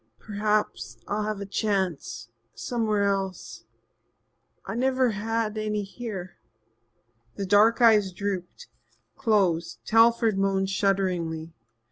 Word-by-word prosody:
Perhaps 210 Hz, -, -2 dB
I'll 210 Hz, +1 st, -1 dB
have 215 Hz, -1 st, -3 dB
a -, -, -4 dB
chance 190 Hz, -, -2 dB, 0.3 s
somewhere 220 Hz, -4 st, -1 dB
else. 195 Hz, -2 st, -3 dB, 1.0 s
I've 230 Hz, -, -4 dB
never 260 Hz, -1 st, +2 dB
had 220 Hz, +1 st, -2 dB
any 210 Hz, -1 st, -1 dB
here." 195 Hz, -3 st, -7 dB, 1.0 s
The 200 Hz, -, -3 dB
dark 215 Hz, +5 st, +4 dB
eyes 210 Hz, -4 st, +5 dB
drooped 185 Hz, -1 st, -5 dB, 0.5 s
closed. 180 Hz, -8 st, +1 dB
Telford 225 Hz, -2 st, +4 dB
moaned 195 Hz, 0 st, +1 dB
shudderingly. 180 Hz, -5 st, -1 dB
205 Hz, 100 wpm, -26 LUFS, 190-220 Hz, 1.0 s, eyes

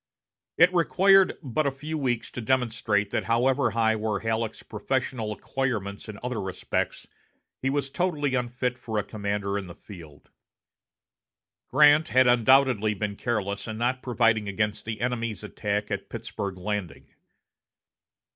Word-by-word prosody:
It 175 Hz, +3 st, +6 dB
required 190 Hz, +2 st, +4 dB
but 140 Hz, +3 st, 0 dB
a -, -, +1 dB
few 150 Hz, +4 st, -6 dB
weeks 125 Hz, -6 st, -1 dB
to 125 Hz, -, -5 dB
demonstrate 115 Hz, -4 st, 0 dB
that -, -, -1 dB
however 125 Hz, +2 st, +2 dB
high 110 Hz, 0 st, +2 dB
were 105 Hz, -2 st, -1 dB
Halleck's 115 Hz, 0 st, -2 dB
professional 115 Hz, 0 st, -2 dB
acquirements 110 Hz, -4 st, -3 dB
in 105 Hz, -, -7 dB
other 125 Hz, -4 st, -2 dB
respects, 95 Hz, -1 st, -3 dB, 0.5 s
he 135 Hz, -, 0 dB
was 140 Hz, -1 st, -1 dB
totally 150 Hz, -6 st, 0 dB
unfit 125 Hz, 0 st, -1 dB
for 110 Hz, -2 st, -4 dB
a 105 Hz, -, +1 dB
commander 100 Hz, -1 st, -2 dB
in 95 Hz, -, -8 dB
the 85 Hz, -, -10 dB
field. 85 Hz, -8 st, -13 dB, 1.4 s
Grant 150 Hz, +2 st, +5 dB
had 130 Hz, 0 st, +5 dB
undoubtedly 120 Hz, -3 st, +4 dB
been 100 Hz, 0 st, -3 dB
careless 100 Hz, -3 st, -2 dB
in 110 Hz, -1 st, -5 dB
not 125 Hz, +3 st, 0 dB
providing 115 Hz, -4 st, +2 dB
against 105 Hz, +1 st, -2 dB
the 110 Hz, -1 st, -5 dB
enemy's 115 Hz, -4 st, -2 dB
attack 105 Hz, 0 st, -3 dB
at 100 Hz, -, -4 dB
Pittsburg 105 Hz, -4 st, -5 dB
Landing. 100 Hz, -1 st, -5 dB
115 Hz, 140 wpm, -26 LUFS, 105-130 Hz, 1.4 s, It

